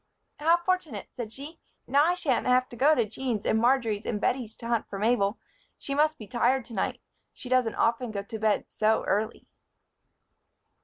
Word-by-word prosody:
"How 330 Hz, +3 st, +4 dB
fortunate!" 345 Hz, -, -2 dB
said 230 Hz, -3 st, -6 dB
she. 290 Hz, +7 st, -9 dB, 0.3 s
"Now 280 Hz, +3 st, +4 dB
I 350 Hz, +2 st, +2 dB
shan't 280 Hz, -10 st, 0 dB
have 255 Hz, 0 st, +3 dB
to -, -, -10 dB
go 290 Hz, +6 st, +4 dB
to 235 Hz, -, +2 dB
Jean's 225 Hz, 0 st, -3 dB
and 220 Hz, -, +2 dB
Marjory's 235 Hz, -4 st, +2 dB
and 210 Hz, -, -2 dB
Bettie's 230 Hz, -2 st, -1 dB
to 230 Hz, -, -8 dB
hunt 235 Hz, -2 st, 0 dB
for 195 Hz, -, -5 dB
Mabel. 210 Hz, -1 st, +1 dB, 0.4 s
She 275 Hz, -, -5 dB
must 305 Hz, +2 st, +2 dB
be 215 Hz, -, -9 dB
tired 255 Hz, +2 st, +1 dB
to 235 Hz, -, -11 dB
night 195 Hz, -, -2 dB, 0.3 s
she 250 Hz, -, -9 dB
doesn't 255 Hz, -3 st, +2 dB
often 235 Hz, +1 st, +1 dB
go 200 Hz, -2 st, -4 dB
to 220 Hz, +2 st, -7 dB
bed 215 Hz, -1 st, +1 dB
so 220 Hz, +1 st, +1 dB
early." 215 Hz, +3 st, -1 dB
240 Hz, 190 wpm, -27 LUFS, 220-270 Hz, 0.4 s, How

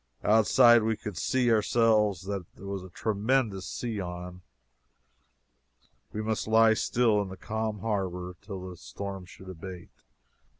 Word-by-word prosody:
"Outside" 115 Hz, +3 st, +6 dB
we 110 Hz, 0 st, 0 dB
could 105 Hz, -2 st, -7 dB
see, 125 Hz, +6 st, +1 dB
ourselves, 110 Hz, -4 st, +3 dB
that 95 Hz, -2 st, -6 dB
there 100 Hz, -, -12 dB
was 100 Hz, -1 st, -4 dB
a 95 Hz, -, -10 dB
tremendous 105 Hz, -1 st, 0 dB
sea 115 Hz, -4 st, -4 dB
on. 90 Hz, 0 st, -6 dB, 1.7 s
We 110 Hz, -, -4 dB
must 110 Hz, 0 st, -2 dB
lie 110 Hz, 0 st, +6 dB
still, 110 Hz, -1 st, +2 dB
in 100 Hz, -, -4 dB
the 95 Hz, -, -9 dB
calm 110 Hz, -2 st, -3 dB
harbor, 90 Hz, -4 st, -3 dB
till 95 Hz, -3 st, -7 dB
the 90 Hz, -1 st, -9 dB
storm 95 Hz, +2 st, -7 dB
should 95 Hz, +1 st, -14 dB
abate. 90 Hz, 0 st, -9 dB
100 Hz, 140 wpm, -28 LUFS, 95-110 Hz, 1.7 s, Outside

